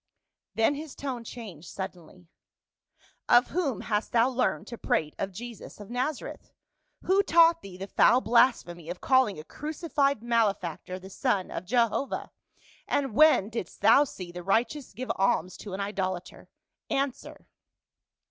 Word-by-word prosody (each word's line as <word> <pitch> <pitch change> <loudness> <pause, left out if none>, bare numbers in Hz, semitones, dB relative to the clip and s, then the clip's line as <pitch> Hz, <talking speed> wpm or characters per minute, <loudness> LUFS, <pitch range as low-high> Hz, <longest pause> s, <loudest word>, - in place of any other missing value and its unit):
Then 225 +5 +3
his 300 0 -7
tone 260 -4 -5
changed 205 -9 -9
sud 190 -1 -5
denly, 175 0 -18 0.5
" - - -36 0.2
Of 245 +1 +6
whom 310 -10 -1
hast 210 -1 -2
thou 235 +2 +4
learned 255 -1 0
to 235 - -8
prate 150 -1 0
of 195 - -2
Jesus 230 +3 -9
of 205 +2 -10
Nazareth? 255 +4 -4 0.5
Who 385 +2 +4
taught 335 -3 +5
thee 190 -7 -10
the 190 - -5
foul 240 +4 +4
blasphemy 220 -9 +2
of 180 - -5
calling 260 -6 +3
a 155 - -8
crucified 290 - -1
malefactor 200 -7 0
the 190 +1 -12
son 205 -5 -1
of 175 - -5
Jehovah? 235 +5 0 0.6
and 270 -5 0
when 305 -7 +5
didst 225 -7 -6
thou 285 - +7
see 185 -10 -8
the 175 0 -7
righteous 235 - 0
give 250 +6 -4
alms 185 -2 +1
to 200 - -8
an - - -6
idolater? 190 -3 -4 0.4
Answer." 275 -2 -3
230 Hz, 150 wpm, -28 LUFS, 190-265 Hz, 0.6 s, thou